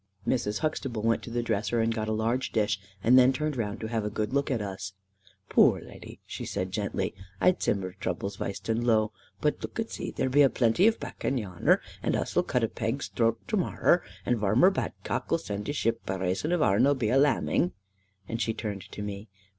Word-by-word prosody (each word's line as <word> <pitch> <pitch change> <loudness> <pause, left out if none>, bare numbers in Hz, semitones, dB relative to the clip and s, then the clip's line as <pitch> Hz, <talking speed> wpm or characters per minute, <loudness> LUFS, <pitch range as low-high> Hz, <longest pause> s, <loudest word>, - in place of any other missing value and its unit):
Mrs. 105 -4 0
Huxtable 135 -8 -2
went 115 0 +2
to - - -8
the 120 +1 -1
dresser, 110 0 0
and 115 0 +2
got 110 -1 -2
a - - -1
large 115 +4 0
dish, 105 -3 +1 0.2
and 125 +3 +7
then 130 +1 +6
turned 150 +1 -2
round 105 -4 -3
to - - -3
have 110 -1 -1
a 105 - -1
good 105 +2 -2
look 140 +1 +1
at 125 -4 0
us. 95 -1 -5 0.5
"Poor - - +5
leddy," - - -11
she - - -6
said 90 0 -3
gently, 100 +1 -2 0.3
"I 185 - +4
sim 100 -2 0
her's 95 0 -5
turble 100 +1 -2
weist 100 0 -5
and 115 +1 0
low. 110 -2 +3 0.3
But - - +1
look - - -6
e - - +2
zee, - - -6
there 130 - -1
be 140 +3 +4
a 140 - +7
plenty 125 - +3
of 225 - +2
bakken 135 - -3
yanner, 95 -7 +2 0.2
and - - 0
us'll - - +1
cut 125 - 0
a - - +3
peg's 115 +5 -3
drort 115 -1 +2
to 215 - +1
morrow, 175 -1 +2 0.2
and 120 -2 +1
Varmer 110 - +5
Badcock - - -3
'll 165 - +4
zend 105 -9 -5
we - - 0
a - - -4
ship, 115 -5 0
by 95 - -2
rason 95 - -1
ourn 140 - +3
be 115 -3 0
all 135 - +5
a'lambing." 135 -10 +2 0.5
Then 115 - -3
she 115 -1 0
turned 105 -3 -4
to 105 - -5
me. 100 +1 -6
115 Hz, 220 wpm, -28 LUFS, 105-130 Hz, 0.5 s, and